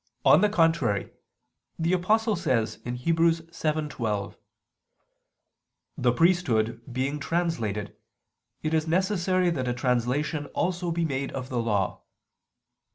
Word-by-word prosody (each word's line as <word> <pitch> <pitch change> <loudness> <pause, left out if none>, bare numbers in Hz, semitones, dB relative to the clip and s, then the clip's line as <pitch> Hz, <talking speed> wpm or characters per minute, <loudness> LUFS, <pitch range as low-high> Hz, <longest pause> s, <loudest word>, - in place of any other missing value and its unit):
On - - +7
the 210 - +4
contrary, 165 - +1 0.7
the 165 +2 0
Apostle 215 +5 +2
says 130 -11 0
(Heb. 120 0 -4
7:12): 155 -7 -1 1.6
"The 120 -1 +2
priesthood 125 -8 +2
being 135 +4 -2
translated 140 - -2 0.7
it 155 +1 -1
is 160 0 +1
necessary 185 0 +1
that 130 -6 -2
a 120 - -1
translation 125 +5 0
also 180 0 -1
be 170 0 0
made 135 -2 -2
of 130 -1 -5
the 125 -2 -1
Law." 105 -5 -1
155 Hz, 110 wpm, -26 LUFS, 125-170 Hz, 1.6 s, On